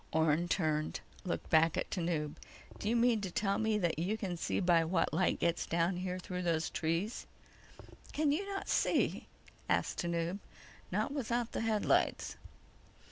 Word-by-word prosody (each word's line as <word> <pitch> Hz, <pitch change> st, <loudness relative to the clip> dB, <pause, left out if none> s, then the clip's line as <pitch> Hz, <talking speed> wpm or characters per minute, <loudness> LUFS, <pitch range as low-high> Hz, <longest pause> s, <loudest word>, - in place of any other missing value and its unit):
Orne 160 Hz, +2 st, +2 dB
turned, 155 Hz, -4 st, 0 dB, 0.3 s
looked 180 Hz, -, -3 dB
back 160 Hz, 0 st, +5 dB
at -, -, -2 dB
Tanub. 165 Hz, -4 st, -1 dB, 0.4 s
"Do 205 Hz, -, -1 dB
you 235 Hz, -, +2 dB
mean 235 Hz, -2 st, +3 dB
to 195 Hz, -, -3 dB
tell 195 Hz, +2 st, 0 dB
me 220 Hz, -1 st, +2 dB
that 175 Hz, -5 st, 0 dB
you 195 Hz, +6 st, 0 dB
can 190 Hz, -5 st, -3 dB
see 170 Hz, -, -1 dB
by 175 Hz, -3 st, +4 dB
what 165 Hz, +1 st, +1 dB
light 185 Hz, -, +2 dB
gets 170 Hz, 0 st, 0 dB
down 170 Hz, +2 st, +1 dB
here 180 Hz, 0 st, -3 dB
through 180 Hz, 0 st, -4 dB
those 165 Hz, -2 st, 0 dB
trees?" 165 Hz, +8 st, -1 dB, 0.8 s
"Can 300 Hz, -1 st, +2 dB
you 320 Hz, +7 st, +1 dB
not 390 Hz, -, -4 dB
see?" -, -, +1 dB, 0.4 s
asked -, -, +1 dB
Tanub. 170 Hz, +2 st, -1 dB, 0.5 s
"Not -, -, 0 dB
without 240 Hz, -4 st, -1 dB
the -, -, -2 dB
headlights." 220 Hz, -2 st, +1 dB
180 Hz, 160 wpm, -34 LUFS, 165-215 Hz, 0.8 s, back